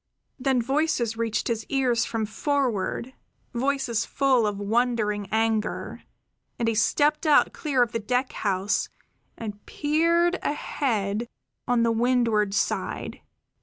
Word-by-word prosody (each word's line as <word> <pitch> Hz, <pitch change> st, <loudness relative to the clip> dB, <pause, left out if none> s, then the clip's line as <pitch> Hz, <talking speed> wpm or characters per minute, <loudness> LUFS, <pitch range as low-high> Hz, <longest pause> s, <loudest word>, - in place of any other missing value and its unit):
Then 260 Hz, -2 st, +1 dB
voices 270 Hz, -4 st, 0 dB
reached 225 Hz, -2 st, -1 dB
his 230 Hz, -2 st, -1 dB
ears 255 Hz, -4 st, +2 dB
from 225 Hz, -1 st, -2 dB
forward, 250 Hz, -1 st, -1 dB, 0.4 s
voices 245 Hz, -2 st, 0 dB
full 260 Hz, -5 st, +2 dB
of 205 Hz, -1 st, -2 dB
wondering 210 Hz, -1 st, 0 dB
anger, 220 Hz, -1 st, -1 dB, 0.6 s
and 235 Hz, -, -1 dB
he 230 Hz, -, +2 dB
stepped 295 Hz, +8 st, +2 dB
out 295 Hz, -, +5 dB
clear 275 Hz, -5 st, +1 dB
of 235 Hz, -, -3 dB
the 230 Hz, -, -2 dB
deck 250 Hz, +4 st, -1 dB
house 195 Hz, 0 st, 0 dB, 0.5 s
and 210 Hz, -2 st, -7 dB
peered 335 Hz, +4 st, +2 dB
ahead 235 Hz, -7 st, -1 dB, 0.4 s
on 245 Hz, -1 st, +3 dB
the 230 Hz, -, +3 dB
windward 230 Hz, -4 st, +2 dB
side. -, -, -2 dB
235 Hz, 125 wpm, -25 LUFS, 220-270 Hz, 0.6 s, out